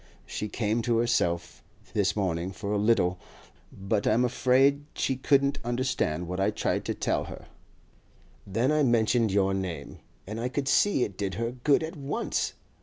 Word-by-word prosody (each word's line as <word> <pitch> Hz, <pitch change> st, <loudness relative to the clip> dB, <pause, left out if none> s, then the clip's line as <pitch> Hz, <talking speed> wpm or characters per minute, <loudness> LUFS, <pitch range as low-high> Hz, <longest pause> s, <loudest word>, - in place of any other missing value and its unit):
She 105 Hz, -, -4 dB
came 110 Hz, +2 st, 0 dB
to 115 Hz, 0 st, +1 dB
herself 85 Hz, -8 st, 0 dB, 0.3 s
this 100 Hz, -1 st, +1 dB
morning 90 Hz, -3 st, -1 dB
for 100 Hz, +2 st, -5 dB
a 105 Hz, -, +1 dB
little, 95 Hz, -5 st, +2 dB, 0.5 s
but 100 Hz, +2 st, -1 dB
I'm 120 Hz, +3 st, +3 dB
afraid 135 Hz, +3 st, +3 dB
she 135 Hz, -, 0 dB
couldn't 140 Hz, +2 st, +2 dB
understand 120 Hz, -, -1 dB
what 90 Hz, +2 st, -4 dB
I 95 Hz, -, +3 dB
tried -, -, -1 dB
to -, -, -2 dB
tell -, -, -1 dB
her; -, -, -9 dB, 1.0 s
then 115 Hz, +8 st, +1 dB
I 155 Hz, 0 st, +3 dB
mentioned 115 Hz, -3 st, +3 dB
your 95 Hz, 0 st, +2 dB
name, 90 Hz, -7 st, -4 dB, 0.3 s
and 110 Hz, +3 st, -5 dB
I 125 Hz, -, -1 dB
could 135 Hz, +1 st, -2 dB
see 195 Hz, -2 st, +3 dB
it 100 Hz, -2 st, -5 dB
did 95 Hz, -3 st, -2 dB
her 115 Hz, +3 st, -2 dB
good 140 Hz, +5 st, +2 dB
at 160 Hz, -, -5 dB
once. 140 Hz, -1 st, -2 dB
115 Hz, 170 wpm, -28 LUFS, 95-130 Hz, 1.0 s, I'm